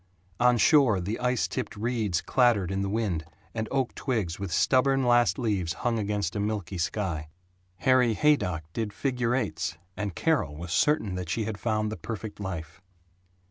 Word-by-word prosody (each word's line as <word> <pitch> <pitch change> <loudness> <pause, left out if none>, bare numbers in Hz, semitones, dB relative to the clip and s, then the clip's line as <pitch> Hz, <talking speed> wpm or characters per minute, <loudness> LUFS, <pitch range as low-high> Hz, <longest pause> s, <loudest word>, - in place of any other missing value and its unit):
On 125 0 +5
shore 120 -3 +5
the 100 +5 -3
ice 125 -1 +1
tipped - - -4
reeds 110 -5 -1
clattered 115 -8 +2
in 95 0 -1
the 100 - -1
wind, 100 -7 -1 0.3
and 110 -1 -2
oak 135 -2 0
twigs 105 -11 -2
with 100 -3 -4
stubborn 135 - +3
last 120 +1 +4
leaves 100 -9 0
hung 115 -2 +2
against 105 -2 -1
a - - -1
milky 100 -3 -2
sky. 85 -4 -2 0.5
Harry 125 +2 +3
Haydock 95 - +2
did 110 -3 -3
figure 125 -3 0
eights, 90 -9 -2 0.2
and 105 -3 -4
Carol 145 - +1
was 85 +2 -5
certain 110 - +2
that 90 -2 -4
she 110 - 0
had 105 -2 -4
found 110 -2 0
the 110 - -5
perfect 110 -2 -6
life. 85 -4 -6
105 Hz, 170 wpm, -27 LUFS, 90-120 Hz, 0.5 s, On